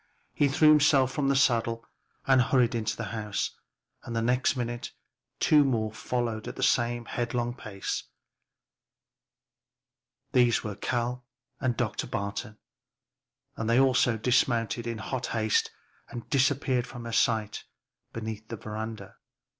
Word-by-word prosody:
He 145 - +3
threw 155 +3 +4
himself 145 -3 +5
from 140 +1 -1
the 140 - +3
saddle 115 -3 +2 0.4
and 135 -1 +5
hurried 125 -2 +3
into 110 -2 -2
the 115 - -4
house, 105 -3 -2 0.5
and 115 - -6
the 115 - +1
next 125 +3 +2
minute 120 -1 -4 0.5
two 150 -1 +5
more 115 -5 0
followed 115 -1 -3
at - - -6
the 135 - -4
same 120 -2 +1
headlong 120 0 -2
pace. 105 -5 -5 2.3
These 120 -3 +3
were 105 - -4
Cal 120 +3 -2 0.4
and 130 -4 -1
Dr. - - -2
Barton, 100 +1 -4 1.0
and 110 0 -3
they 120 +2 +4
also 125 -3 +3
dismounted 120 0 +1
in 115 -1 -3
hot 125 +3 -4
haste 110 -2 +1 0.4
and 120 -2 -8
disappeared 135 -2 +2
from 120 -2 -9
her 115 - -5
sight 110 -3 +1 0.5
beneath 110 -1 -6
the 115 - -6
veranda. 110 +2 -7
120 Hz, 135 wpm, -28 LUFS, 110-130 Hz, 2.3 s, himself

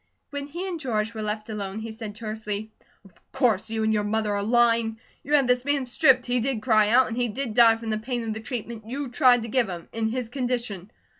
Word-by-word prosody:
When 285 -1 -4
he 345 +6 -5
and 350 -3 -4
George 220 -5 -1
were 220 - -5
left 215 0 -3
alone 205 -2 -5
he 220 +1 -5
said 220 -2 -7
tersely: 215 -1 -5 0.3
"Of 190 - -20
course 220 -4 +1
you 220 0 -1
and 220 0 +2
your 210 -1 +1
mother 210 0 0
are 200 - -1
lying. 230 0 +2 0.3
You 295 +2 +2
had 275 -3 +3
this 250 0 +2
man 285 -1 0
stripped, 255 0 +4
he 245 0 +1
did 235 -2 -1
cry 215 -3 +4
out, 245 +3 +5
and 225 - -4
he 245 0 0
did 235 +1 -3
die 230 -1 +6
from 225 -1 -5
the 215 - -1
pain 240 +1 -3
of 220 -1 -3
the 220 - -5
treatment 225 -2 -6
you 275 +1 -4
tried 245 -2 +4
to - - -5
give 240 -2 +1
him, 175 -2 -7
in 225 -1 -1
his 245 0 -3
condition. 240 -7 -3
230 Hz, 240 wpm, -25 LUFS, 215-250 Hz, 0.3 s, die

